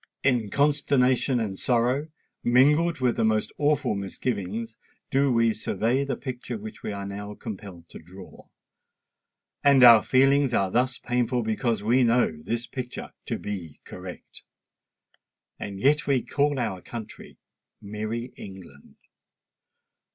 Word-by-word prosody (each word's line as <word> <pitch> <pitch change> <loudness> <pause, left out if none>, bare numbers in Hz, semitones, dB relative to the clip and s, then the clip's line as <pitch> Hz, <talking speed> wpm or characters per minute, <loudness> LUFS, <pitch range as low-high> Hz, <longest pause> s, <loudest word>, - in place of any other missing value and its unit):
In 125 -6 +2
consternation 140 -2 +2
and 100 -4 -3
sorrow, 125 +4 +1 0.4
mingled 150 +6 +3
with 125 -2 +1
the - - +1
most 110 -1 +1
awful 150 -4 +2
misgivings, 105 +2 -4 0.4
do 135 0 +3
we 115 -1 +3
survey 115 +4 0
the 140 - -2
picture 125 -3 -6
which 110 +1 -9
we - - -4
are 100 -1 -5
now 100 +1 -6
compelled 100 -7 -9
to - - -10
draw;—and 95 - -4
our 115 -3 +10
feelings 135 -1 +3
are 95 -1 +1
thus 125 +3 +1
painful 125 0 -1
because 110 -1 -1
we 120 +4 +3
know 120 0 +3
this 115 +7 -3
picture 125 -1 -7
to - - -2
be 90 -7 -6
correct! - - -10 1.2
And 100 -1 -6
yet 145 +7 +2
we 135 -4 +2
call 145 0 0
our 105 -7 -2
country 115 +1 -9 0.4
"MERRY 110 +4 -5
ENGLAND!" 95 -8 -12
120 Hz, 130 wpm, -26 LUFS, 105-130 Hz, 1.2 s, our